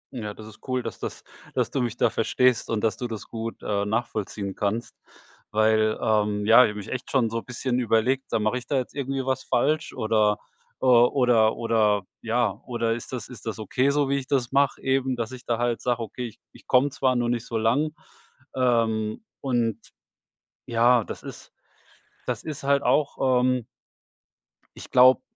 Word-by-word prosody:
Ja, 105 -3 -5
das 110 - -11
ist 110 -1 -13
cool, 130 -1 -1
dass - - -6
das - - -6 0.3
dass - - 0
du 135 - 0
mich 120 -1 -2
da - - +2
verstehst 125 -2 +2
und 110 -2 -1
dass 110 - +1
du 125 - -3
das 110 -3 -7
gut, 115 0 -5
äh, 100 -1 0
nachvollziehen 105 -3 -3
kannst, 105 +3 -2 0.5
weil, 110 0 +2
ähm, 105 -1 +1
ja, 115 +1 +7
ich - - 0
habe 105 0 -6
nämlich 100 - -8
echt 130 0 -5
schon 120 -5 +1
so 115 - -2
bisschen 125 0 -2
überlegt, 125 +3 +1
sag - - 0
mal 110 0 +1
mache 125 - -2
ich - - -14
da - - -1
jetzt 130 - -3
irgendwie 135 -1 -3
was 130 0 -1
falsch 150 +5 0
oder, 110 -1 +2 0.4
äh - - -1
oder 120 -2 +4
oder 110 -4 +2 0.2
ja. 115 -3 0
Oder 115 -2 0
ist 120 - -6
das 125 - -5
ist 120 -2 -11
das 110 - -3
okay 125 +5 0
so, 145 0 +2
wie 140 +1 +1
ich 130 - -9
das 130 -4 0
mache 140 0 +2
eben, 135 -1 +1
dass 115 0 -4
ich 125 -1 -10
da 120 - 0
halt 120 0 -1
sage: 120 -1 0
„Okay, 120 +3 -5
ich 110 - -13
ich - - -19
komme 130 +3 +4
zwar, 130 -2 +1
nur 120 -1 0
nicht 120 -1 -2
so 115 - -2
lang.“ 130 +8 +1 0.6
Ähm, 115 - +1 0.2
und 120 -5 0 0.9
ja, 120 0 +4
das - - -8
ist - - -10 0.7
das - - -3
ist 150 -4 -6
halt 140 0 +2
auch, 130 -1 +2
ähm 125 -2 +1 1.1
ich - - -10
glaube, 130 +1 +6
120 Hz, 195 wpm, -25 LUFS, 110-130 Hz, 1.1 s, ja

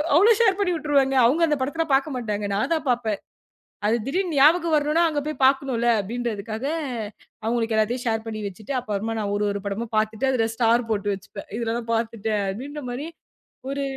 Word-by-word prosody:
அவ்வளவு 415 +7 +6
ஷேர் 385 -5 +4
பண்ணி 370 -3 +1
விட்டுருவாங்க. 280 -4 +2
அவங்க 305 +8 +3
அந்தப் 295 -4 0
படத்த 325 +5 -1
பாக்க 280 +2 0
மாட்டாங்க. 210 -3 -2
நான் 215 - -1
தான் 315 - -1
பாப்பேன். 230 -4 0 0.7
அது 225 - +3
திடீர்னு 345 0 -1
ஞாபகம் 325 +3 +5
வரணும். 305 +3 +2
அங்க 300 -2 -1
போய்ப் 300 -3 -2
பாக்கணும்னு 260 -3 +2
அப்படின்னுறதுக்காக 225 +1 -4 0.8
அவங்களுக்கு 225 -1 0
எல்லாத்தையும் 240 +3 0
ஷேர் 225 0 0
பண்ணி 215 -1 -4
வச்சிட்டு 205 +7 -7
அப்புறம் 215 -1 -3
நான் 200 -1 -2
ஒரு 205 0 0
ஒரு 200 - -4
படமா 220 +4 -3
பாத்துட்டு 220 +4 +1
அதுல 225 -3 +1
ஸ்டார் 235 0 +2
போட்டு 205 -1 0
வச்சிப்பேன். 200 +1 -11
இதெல்லாம் 230 0 -3
பாத்துட்டேன் 225 -2 -1
அப்படின்ற 280 +9 -6
மாரி, 270 +6 -4 0.6
ஒரு 280 0 -2
240 Hz, 170 wpm, -24 LUFS, 220-290 Hz, 0.8 s, அவ்வளவு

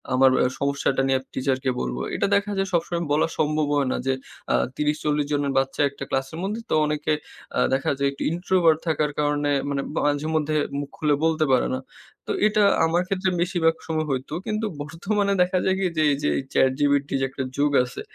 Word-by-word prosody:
আমার 130 0 +6 0.3
সমস্যাটা 140 -1 0
নিয়ে 135 0 +2
টিচারকে 130 0 0
বলবো। 60 0 -3
এটা - - +1
দেখা 200 +1 0
যায় 195 0 0
সবসময় 170 0 0
বলা 150 +2 +3
সম্ভব 155 0 +1
হয় 140 -2 +1
না। - - -1
যে 135 - +3 0.4
আ - - +4 0.2
৩০ 150 0 0
৪০ 150 -1 +1
জনের 145 -1 0
বাচ্চা 135 +1 0
একটা 140 0 -9
ক্লাসের 135 +4 -2
মধ্যে 210 +4 -3
তো - - 0
অনেকে 150 0 0 0.4
অ্যাঁ - - +2
দেখা 135 - +1
যায় 140 0 +1
একটু 140 - -6
introvert 170 -2 +2
থাকার 150 -2 +1
কারণে 145 0 +1 0.2
মানে 140 -1 -1 0.2
মাঝে 145 +1 0
মধ্যে 155 0 0 0.2
মুখ 145 - -5
খুলে 150 -2 +2
বলতে 160 -1 +2
পারে 130 - +3
না। 130 - -1 0.5
তো - - -1 0.2
এটা 215 0 +2 0.2
আমার 170 +2 +2
ক্ষেত্রে 190 0 0
বেশিরভাগ 170 -3 +2
সময় 155 -1 -1
হইতো 130 +2 -3
কিন্তু 215 +1 -1 0.2
বর্তমানে 200 +7 -1
দেখা 180 +1 +2
যায় 190 - +2
কি 195 - 0
যে 155 - +3
এই 140 - +2
যে - - +2
এই - - 0
চ্যাটজিপিটির 140 +1 +2
যে - - +2
একটা 135 0 -4
যুগ 145 0 +2
আছে 125 0 -7
150 Hz, 200 wpm, -24 LUFS, 140-170 Hz, 0.5 s, আমার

